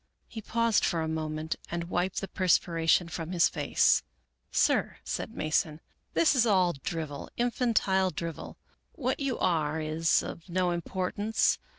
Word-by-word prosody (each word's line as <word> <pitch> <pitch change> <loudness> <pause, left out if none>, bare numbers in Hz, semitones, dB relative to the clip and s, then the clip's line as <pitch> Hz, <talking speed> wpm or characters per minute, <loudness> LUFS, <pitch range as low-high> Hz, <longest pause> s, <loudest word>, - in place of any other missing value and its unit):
He 225 - -7
paused 230 0 +1
for 165 -2 +1
a - - -2
moment 155 0 -3
and 170 0 -2
wiped 180 +1 0
the 195 - -4
perspiration 170 -2 +2
from 170 0 -5
his 170 -2 +5
face, - - +3 0.3
" 65 +1 -49
Sir," - - +2
said - - -4
Mason, 155 0 0 0.2
" - - -46
this 330 - +4
is 250 - +4
all 185 -4 +3
drivel, 155 -4 -4
infantile 230 -6 +2
drivel. 170 -3 -6 0.4
What 255 -4 -2
you 275 -3 -1
are 160 -3 +1
is 160 +1 +1
of 170 - -8
no 180 0 +1
importance. 185 +5 0
175 Hz, 155 wpm, -29 LUFS, 160-200 Hz, 0.4 s, his